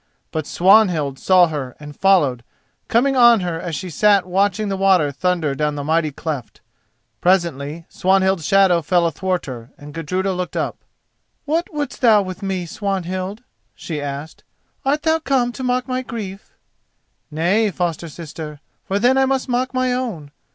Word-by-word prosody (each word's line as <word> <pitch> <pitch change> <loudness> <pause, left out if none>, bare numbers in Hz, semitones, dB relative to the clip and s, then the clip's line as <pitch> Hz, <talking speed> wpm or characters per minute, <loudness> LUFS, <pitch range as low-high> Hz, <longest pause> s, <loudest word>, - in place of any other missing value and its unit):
But 155 -2 -3
Swanhild 175 -8 +3
saw 185 -2 +5
her 135 -5 -5
and 150 -1 -10
followed, 145 -12 +3 0.4
coming 270 +4 +2
on 240 -4 +6
her 175 -2 -3
as 165 -2 -4
she 185 +2 -5
sat 200 +4 +3
watching 200 +3 +1
the 195 - -1
water 190 -6 +3
thunder 165 0 0
down 150 +1 -1
the 145 - -4
mighty 160 +1 +1
cleft. 140 -4 -5 0.6
Presently 170 -4 0
Swanhild's 190 -3 +1
shadow 190 -3 +4
fell 175 +2 +2
athwart 180 +3 -1
her, 120 -3 -8
and 145 0 -11
Gudruda 185 +4 -2
looked 180 0 -4
up. - - -3 0.6
"What 325 +4 -1
wouldst 290 -4 -4
thou 220 -5 +5
with 185 -1 -7
me, 190 -2 -2
Swanhild?" 190 +3 -3 0.3
she 155 -4 -5
asked. 145 +2 -6 0.4
"Art 290 +2 0
thou 320 0 +2
come 265 -5 +1
to 260 - -7
mock 250 0 0
my 255 0 -1
grief?" 210 -6 -8 0.7
"Nay, 180 +8 +1
foster 170 -3 -3
sister, 155 -1 -8 0.2
for 195 - -1
then 250 +5 +3
I 265 - +3
must 265 0 0
mock 255 +1 0
my 255 -1 0
own. 215 - -4
185 Hz, 160 wpm, -20 LUFS, 160-220 Hz, 0.7 s, on